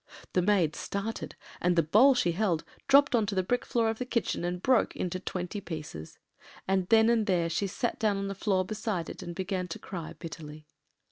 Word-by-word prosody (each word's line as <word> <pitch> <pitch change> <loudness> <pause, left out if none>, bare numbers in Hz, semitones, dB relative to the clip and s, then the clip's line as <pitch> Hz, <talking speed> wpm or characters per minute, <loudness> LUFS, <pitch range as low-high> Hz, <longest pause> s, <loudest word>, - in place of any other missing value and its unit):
The 180 - +3
maid 180 -5 +2
started, 200 +3 -4 0.3
and 180 0 +2
the 165 - +4
bowl 235 - +6
she 175 -8 +2
held 175 -3 0 0.2
dropped 280 +1 +6
on 225 -4 +3
to 200 - -2
the 185 - +2
brick 245 +7 0
floor 230 -2 +1
of 225 0 -1
the 250 - -2
kitchen 235 -7 -1
and 175 +1 -2
broke 255 +4 +2
into 185 0 -3
twenty 185 +2 -4
pieces; 150 - -7 0.5
and 190 -1 +1
then 225 -1 +6
and 230 -2 +2
there 175 -3 +2
she 200 +4 0
sat 235 +5 -2
down 210 -2 +2
on 195 0 -2
the 195 - -3
floor 190 -1 0
beside 210 -4 -3
it, - - -10
and 175 -2 -6
began 185 -1 -2
to 165 - -6
cry 170 -5 -7
bitterly. 155 -1 -9
190 Hz, 210 wpm, -29 LUFS, 175-220 Hz, 0.5 s, bowl